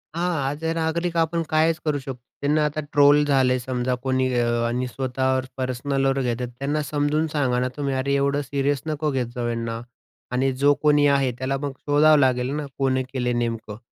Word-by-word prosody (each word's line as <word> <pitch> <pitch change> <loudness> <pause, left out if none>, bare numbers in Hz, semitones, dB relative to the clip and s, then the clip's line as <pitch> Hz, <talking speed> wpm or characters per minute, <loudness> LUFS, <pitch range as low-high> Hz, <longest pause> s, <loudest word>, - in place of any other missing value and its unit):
हां, 175 +1 0 0.2
as 145 +3 -6
a, 165 - +1
नागरिक 165 +1 -1
आपण 165 +1 +1
कायच 160 +1 +2
करू 145 -2 0
शकतो. 130 -2 -7 0.2
त्यांना 150 +2 +2
आता 150 +1 -2
ट्रोल 145 0 +6
झाले 130 -3 +3
समजा 125 0 -2
कोणी 130 -1 +1
अ, 120 - +2 0.2
आणि 125 +2 -1
स्वतःवर 130 0 -1
पर्सनलवर 135 +1 0
घेतात 125 0 -2
त्यांना 145 +2 -1
समजून 150 +2 0
सांगा 130 -4 +1
ना 125 - 0
तुम्ही, 140 -2 -1
की 130 - -1
अरे 140 +1 0
एवढं 140 +1 +1
सीरियस 140 0 -1
नको 155 -1 -1
घेत 130 -3 -1
जाऊ 120 -1 -2
यांना 115 0 -3 0.5
आणि 130 +2 +1
जो 140 +3 +4
कोणी 145 -1 +4
आहे. 140 -2 +2
त्याला 135 +1 -1
मग 140 0 -4
शोधावं 150 +1 +4
लागेल 125 -1 +2
ना, 150 -1 -3
कोणी 130 -1 +1
केलंय 125 -2 0
नेमकं 115 -3 -3
135 Hz, 190 wpm, -23 LUFS, 130-145 Hz, 0.5 s, ट्रोल